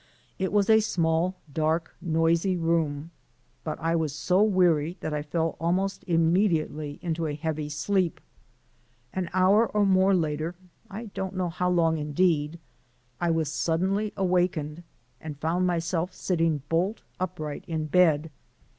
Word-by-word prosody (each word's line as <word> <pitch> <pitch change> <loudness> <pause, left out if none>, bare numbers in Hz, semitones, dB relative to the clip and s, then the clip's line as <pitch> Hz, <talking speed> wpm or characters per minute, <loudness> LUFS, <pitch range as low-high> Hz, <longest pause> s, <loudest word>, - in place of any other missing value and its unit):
It 190 0 -1
was 205 -1 +3
a 220 0 +6
small, 170 -3 +1 0.2
dark, 160 +2 0
noisy 165 +2 +1
room, 165 -2 0 0.5
but 155 - -4
I 165 +1 0
was 155 -3 -1
so 180 +5 +2
weary 180 -5 +3
that 155 - -4
I 150 - -1
fell 160 +2 -1
almost 185 +4 0
immediately 165 -3 +1
into 165 -1 -1
a 145 - -3
heavy 155 -1 -3
sleep. 175 +3 0 0.9
An 185 -2 -2
hour 190 +5 +4
or 210 -1 +1
more 190 0 +4
later 160 0 -1 0.3
I 215 +2 -7
don't 190 0 -4
know 185 -1 -1
how 180 +2 -1
long 165 -3 +2
indeed 150 0 +1 0.6
I 175 - 0
was 160 -3 0
suddenly 190 +7 0
awakened 175 -4 0 0.4
and 155 -2 -7
found 175 +4 +1
myself 170 +1 -1
sitting 165 -5 0
bolt 180 +8 0 0.2
upright 175 -3 -4
in 160 -2 -2
bed. 160 -1 +3
170 Hz, 140 wpm, -27 LUFS, 155-185 Hz, 0.9 s, a